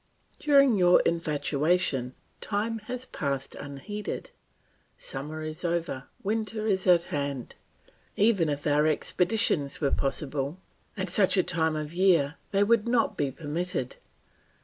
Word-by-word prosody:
"During 275 -5 +5
your 180 -1 +6
infatuation 150 -4 0 0.2
time 220 +2 -2
has 250 0 -4
passed 140 - -3
unheeded. 190 +9 -6 0.7
Summer 150 +4 -5
is 155 +2 -5
over, 170 -6 -2 0.2
winter 215 +1 -2
is 190 -3 0
at 175 -2 +6
hand. 140 -3 -3 0.6
Even 200 -6 +3
if 145 0 -3
our 150 +1 +3
expeditions 170 -2 +1
were 140 -3 +1
possible, 140 +2 -1 0.4
at 190 -2 -1
such 195 0 +4
a 185 - +4
time 160 -3 +1
of 155 +1 -4
year 170 -5 +3
they 200 0 +2
would 230 +1 +2
not 235 -1 +2
be 145 -2 0
permitted. 155 0 -4
170 Hz, 125 wpm, -27 LUFS, 145-200 Hz, 0.7 s, your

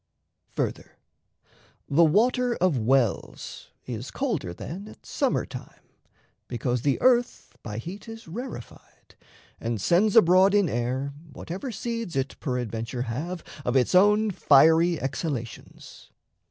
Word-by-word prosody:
Further, - - -3 0.9
the 155 +4 +4
water 240 +8 +3
of 180 -4 +2
wells 120 -1 -1 0.2
is 120 +1 -5
colder 210 - -2
then 175 - -7
At - - -15
summer - - 0
time, - - -11 0.6
because 120 0 -2
the 140 +1 +1
earth 245 -1 +2
by 105 -2 -6
heat 185 - -7
Is 225 -2 -10
rarefied, 220 - -9 0.5
and 115 -1 -3
sends 180 - +3
abroad 190 -1 +6
in 205 -3 +4
air 130 +2 -2 0.2
Whatever 190 - -6
seeds 230 - -4
it 135 0 -2
peradventure 120 -2 -3
have 155 +10 -4 0.2
Of 125 - -1
its 130 +5 +3
own 210 +3 +5
fiery 160 +1 +5
exhalations. 130 -3 -6
160 Hz, 120 wpm, -26 LUFS, 125-205 Hz, 0.9 s, abroad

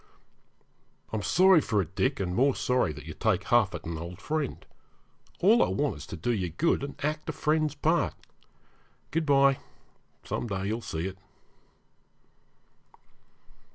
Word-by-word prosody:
'I'm 110 - -1
sorry 185 - +5
for 105 -7 0
it, 90 -1 -2
Dick, 130 +7 0
and 90 -2 -2
more 135 +6 +3
sorry 125 -10 +1
that - - -10
you - - -7
take 100 -4 0
huff 120 -4 +3
at - - -8
an 80 -1 -4
old 85 +2 -7
friend. 155 -3 -3 0.8
All 220 +6 +6
I - - +4
want 145 0 0
is - - -10
to - - -7
do 120 - -1
you 95 -6 -1
good, 135 - +1
and 140 - -6
act 155 +1 -2
a - - +1
friend's 155 -1 0
part. 160 +3 +1 1.0
Good 160 -1 -1
bye 140 -1 +4 0.6
some - - -3
day 95 -2 -3
you'll 110 +4 -2
see 80 -5 -4
it.' 95 0 -6
125 Hz, 155 wpm, -28 LUFS, 95-150 Hz, 1.0 s, All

